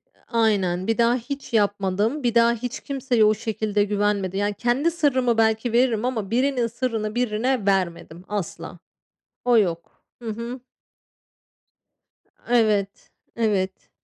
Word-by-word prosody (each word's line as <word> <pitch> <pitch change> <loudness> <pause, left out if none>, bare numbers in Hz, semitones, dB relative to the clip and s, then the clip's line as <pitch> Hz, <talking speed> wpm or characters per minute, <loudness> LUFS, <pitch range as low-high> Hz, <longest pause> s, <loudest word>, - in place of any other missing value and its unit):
Iıı, - - -31 0.2
aynen. 190 -4 +1
Bir 225 - +1
daha 235 +1 +3
hiç 255 +1 -6
yapmadım. 205 +5 +1
Bir 240 -1 0
daha 235 0 +5
hiç 240 +1 -5
kimseye 260 -5 +1
o 215 - +5
şekilde 215 -1 -1
güvenmedim 200 -2 0
yani. 205 0 0
Kendi 245 +9 +1
sırrımı 260 -8 +1
belki 220 +1 +1
veririm 240 -2 +2
ama 225 -5 -2
birinin 250 -1 +1
sırrını 230 -2 -3
birine 245 -1 0
vermedim, 180 -3 -1
asla. 175 -4 -5 0.7
O 245 -2 +4
yok. 170 -5 -2 0.2
Hı 230 - -6
hı. 235 +3 -6 1.9
Iıı, 245 - +2
evet. 205 -3 0 0.2
Evet. 200 -5 -1
220 Hz, 135 wpm, -23 LUFS, 205-245 Hz, 1.9 s, daha